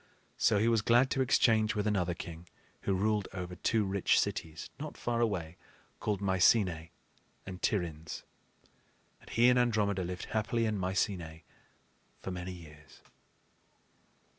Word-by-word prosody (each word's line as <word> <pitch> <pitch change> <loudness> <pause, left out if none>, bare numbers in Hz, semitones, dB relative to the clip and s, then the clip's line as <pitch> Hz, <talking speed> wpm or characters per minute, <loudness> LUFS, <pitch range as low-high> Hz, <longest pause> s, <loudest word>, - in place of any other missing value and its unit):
So 110 - +4
he 110 +3 +2
was 115 -2 +3
glad 120 +4 +4
to 135 - +1
exchange 110 -4 +3
with 105 0 -1
another 90 -5 0
king 85 0 -9 0.3
who 100 - 0
ruled 105 0 0
over 90 -1 -5
two 110 +3 +1
rich 95 -1 +2
cities, 80 -1 -3
not 155 +1 -6
far 120 -1 -1
away, 90 -8 -1 0.4
called 105 -2 -2
Mycenae 95 -3 +3 0.6
and 95 -1 -8
Tiryns. 80 -6 -2 1.0
And - - -16
he 120 +1 +4
and 125 0 +5
Andromeda 105 -5 +1
lived 90 0 -5
happily 115 +1 0
in 110 -1 0
Mycenae 90 -3 -2 0.8
for 95 - -6
many 90 0 -5
years. 75 -4 -14
100 Hz, 140 wpm, -31 LUFS, 90-110 Hz, 1.0 s, and